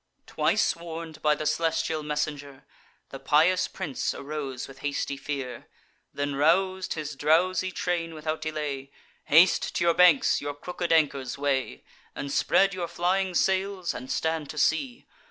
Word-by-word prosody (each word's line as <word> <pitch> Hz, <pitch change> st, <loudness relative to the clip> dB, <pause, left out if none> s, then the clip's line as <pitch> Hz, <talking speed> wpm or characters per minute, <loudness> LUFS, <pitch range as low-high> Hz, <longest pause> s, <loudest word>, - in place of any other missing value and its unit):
Twice -, -, +1 dB
warn'd 165 Hz, -1 st, -8 dB
by 150 Hz, -1 st, +3 dB
the 155 Hz, -, -5 dB
celestial 160 Hz, +1 st, 0 dB
messenger, 145 Hz, -2 st, -4 dB, 0.4 s
The 135 Hz, -, -8 dB
pious 160 Hz, +7 st, +3 dB
prince 165 Hz, -9 st, -3 dB
arose 140 Hz, -3 st, -5 dB
with 135 Hz, 0 st, -13 dB
hasty 140 Hz, 0 st, -2 dB
fear; 135 Hz, -3 st, -5 dB, 0.4 s
Then 145 Hz, 0 st, -3 dB
rous'd 185 Hz, +6 st, +2 dB
his 155 Hz, -2 st, -5 dB
drowsy 180 Hz, +6 st, +2 dB
train 170 Hz, -2 st, -2 dB
without 155 Hz, 0 st, -3 dB
delay: 150 Hz, -3 st, -4 dB, 0.4 s
"Haste 165 Hz, +5 st, +4 dB
to -, -, +1 dB
your 170 Hz, -1 st, +4 dB
banks; 175 Hz, -5 st, +5 dB
your 145 Hz, 0 st, -4 dB
crooked 175 Hz, +3 st, -4 dB
anchors 140 Hz, -6 st, +1 dB
weigh, 135 Hz, -, -1 dB, 0.3 s
And 140 Hz, -, -5 dB
spread 195 Hz, +6 st, +3 dB
your 180 Hz, -2 st, -3 dB
flying 180 Hz, +2 st, 0 dB
sails, 190 Hz, -1 st, 0 dB
and 130 Hz, -, -7 dB
stand 160 Hz, -3 st, -1 dB
to 150 Hz, -, -8 dB
sea. 240 Hz, -, 0 dB
155 Hz, 145 wpm, -27 LUFS, 145-175 Hz, 0.4 s, banks